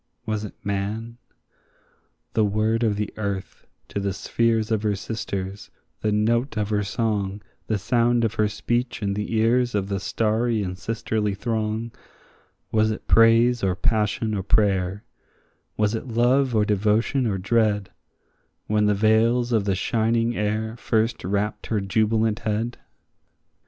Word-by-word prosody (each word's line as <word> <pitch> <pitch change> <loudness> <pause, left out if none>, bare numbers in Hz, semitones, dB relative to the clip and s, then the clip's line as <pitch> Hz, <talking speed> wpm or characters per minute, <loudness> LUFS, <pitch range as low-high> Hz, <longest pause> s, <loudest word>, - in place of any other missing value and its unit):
was 110 -1 -2
it 105 - -7
man? 105 +4 -3 1.1
The 110 - +3
word 110 +2 +1
of 110 -3 +2
the 105 0 -3
earth 100 -2 -5 0.2
to - - -3
the 100 -1 -1
spheres 115 +3 0
her 110 -2 +1
sisters, 100 -2 -5 0.3
the 105 - +1
note 115 +4 +1
of 105 -1 -1
her 105 -1 +1
song, 105 -1 -2 0.2
The 110 - +1
sound 120 +3 +2
of 110 - -1
her 105 - +2
speech 120 +3 -2
in 100 -1 0
the 105 +2 -3
ears 120 +2 +2
of 100 -1 -1
the 100 -1 -1
starry 110 +2 0
and 90 -1 -4
sisterly 105 0 -2
throng, 110 +1 -2 0.8
Was 110 0 +3
it 110 - -4
praise 115 +2 +5
or 95 -2 +1
passion 110 +1 0
or 100 - -1
prayer, 100 -1 +1 0.7
was 105 0 +1
it 115 +3 -4
love 125 +2 +2
or 105 -1 +3
devotion 105 +5 +1
or 100 -3 0
dread, 105 -1 +1 0.7
When 105 0 +2
the 105 - +3
veils 115 +4 +3
of 110 -4 +2
the 100 -2 +1
shining 115 +3 +1
air 110 +2 -1
first 115 0 0
wrapt 100 +3 -2
her 110 - 0
jubilant 110 +2 +1
head? 110 +3 -2
110 Hz, 145 wpm, -24 LUFS, 105-115 Hz, 1.1 s, praise